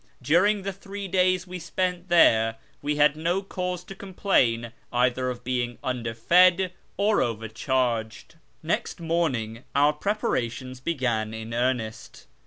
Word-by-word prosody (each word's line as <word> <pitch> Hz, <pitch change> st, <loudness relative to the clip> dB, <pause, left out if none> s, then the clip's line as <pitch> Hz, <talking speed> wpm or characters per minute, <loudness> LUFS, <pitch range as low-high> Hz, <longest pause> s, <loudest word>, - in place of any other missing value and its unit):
During 185 Hz, +8 st, +3 dB
the 195 Hz, 0 st, -3 dB
three 200 Hz, +1 st, -7 dB
days 185 Hz, 0 st, +2 dB
we 180 Hz, 0 st, -7 dB
spent 180 Hz, +1 st, -2 dB
there 115 Hz, -10 st, +5 dB, 0.3 s
we 150 Hz, +1 st, -1 dB
had 150 Hz, 0 st, +4 dB
no 170 Hz, +5 st, -1 dB
cause 180 Hz, -2 st, -4 dB
to 195 Hz, -, -9 dB
complain 155 Hz, -, 0 dB, 0.2 s
either 125 Hz, +1 st, +1 dB
of 125 Hz, -1 st, -6 dB
being 120 Hz, -1 st, -2 dB
underfed 170 Hz, +10 st, +3 dB, 0.3 s
or 205 Hz, +2 st, +3 dB
overcharged. 115 Hz, 0 st, -2 dB, 0.3 s
Next -, -, -2 dB
morning 135 Hz, -9 st, -1 dB
our 145 Hz, +2 st, +4 dB
preparations 130 Hz, -, -2 dB
began 120 Hz, -7 st, -1 dB
in 110 Hz, +1 st, -7 dB
earnest. 120 Hz, -2 st, -2 dB
145 Hz, 125 wpm, -26 LUFS, 120-180 Hz, 0.3 s, there